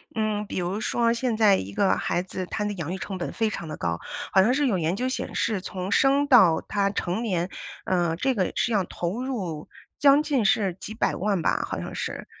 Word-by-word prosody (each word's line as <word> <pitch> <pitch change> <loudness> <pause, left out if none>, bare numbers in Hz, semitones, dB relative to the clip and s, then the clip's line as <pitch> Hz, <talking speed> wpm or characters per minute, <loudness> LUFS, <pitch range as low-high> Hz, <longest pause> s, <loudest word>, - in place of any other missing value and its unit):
嗯， 215 -1 -1
比 - - -5
如 180 +4 -2
说 230 +1 +1
现 235 -1 -1
在 210 -3 +5
一 100 +1 -6
个 195 - +2
孩 175 - -1
子， 185 0 -5
他 210 +3 -3
的 205 0 -2
养 170 -1 -4
育 - - -3
成 190 -1 -5
本 175 - -4
非 225 -1 +1
常 170 -6 -6
地 155 - -5
高， 85 0 -2 0.3
好 190 - +6
像 235 +6 +3
是 285 +1 +1
有 205 -8 +2
研 165 +2 0
究 255 +4 -1
显 - - -4
示 215 -4 0
从 185 +1 -5
生 280 +4 +3
到 190 - +6
他 200 -1 +1
成 195 +2 -2
年， 180 -4 -1 0.4
呃， 175 -3 +1
这 265 +9 +1
个 185 -6 -1
是 235 - +1
要 200 -3 +2
投 180 +9 -4
入 190 - -4 0.3
将 285 +1 +6
近 270 -9 +1
是 210 -6 +2
几 220 - -7
百 220 - 0
万 195 -2 0
吧， - - +1
好 - - -4
像 - - -6
是， - - -4
200 Hz, 245 characters per minute, -25 LUFS, 180-235 Hz, 0.4 s, 好